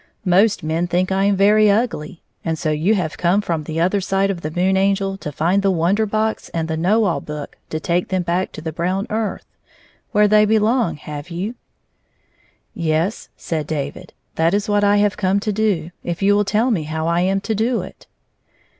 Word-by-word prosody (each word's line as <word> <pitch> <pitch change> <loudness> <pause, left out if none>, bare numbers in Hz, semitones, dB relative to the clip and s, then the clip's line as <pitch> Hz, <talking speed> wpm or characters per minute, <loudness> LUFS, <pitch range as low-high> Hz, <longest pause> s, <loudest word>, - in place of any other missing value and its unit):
" - - -45
Most 195 +3 +3
men 160 +3 -1
think 180 +2 0
I 195 +1 +2
am 200 0 +3
very 210 +2 +5
ugly. 200 -6 -1 0.2
And 165 -1 -1
so 155 0 -1
you 165 +8 +2
have 160 -6 -3
come 180 +3 +3
from 165 -6 -2
the 160 +1 -3
other 185 +4 +2
side 195 +1 +1
of 175 -3 -5
the 155 - -3
Moon 180 +4 +1
Angel 195 0 +1
to 150 - -6
find 170 +7 +1
the 195 - +2
Wonder 190 +5 +1
Box 220 +1 -1
and 165 -1 -1
the 160 - -2
Know 195 +8 +2
All 180 -5 0
Book 150 -1 -7
to 155 - -3
take 175 +2 0
them 185 -2 -1
back 175 +2 -1
to - - -8
the 160 0 -4
brown 180 +5 -1
earth, 220 -1 -2 0.7
where 210 0 +4
they 210 +1 +5
belong, 220 0 +2
have 150 +2 -8
you? 185 +7 -4 0.7
" - - -39 0.2
"Yes," 170 +8 -1
said 155 -3 -3
David; 145 -3 -5 0.2
"that 165 +4 +3
is 205 +1 -1
what 205 0 +2
I 205 0 +4
have 205 -1 +2
come 195 0 +1
to 215 - -1
do, 195 -6 0
if 175 +2 -3
you 200 +1 +5
will 205 0 +2
tell 220 +5 +1
me 195 -8 +1
how 160 +1 -3
I 170 +1 +2
am 190 +2 +1
to 220 - -2
do 225 +3 0
it." - - -12
190 Hz, 215 wpm, -20 LUFS, 165-205 Hz, 0.7 s, very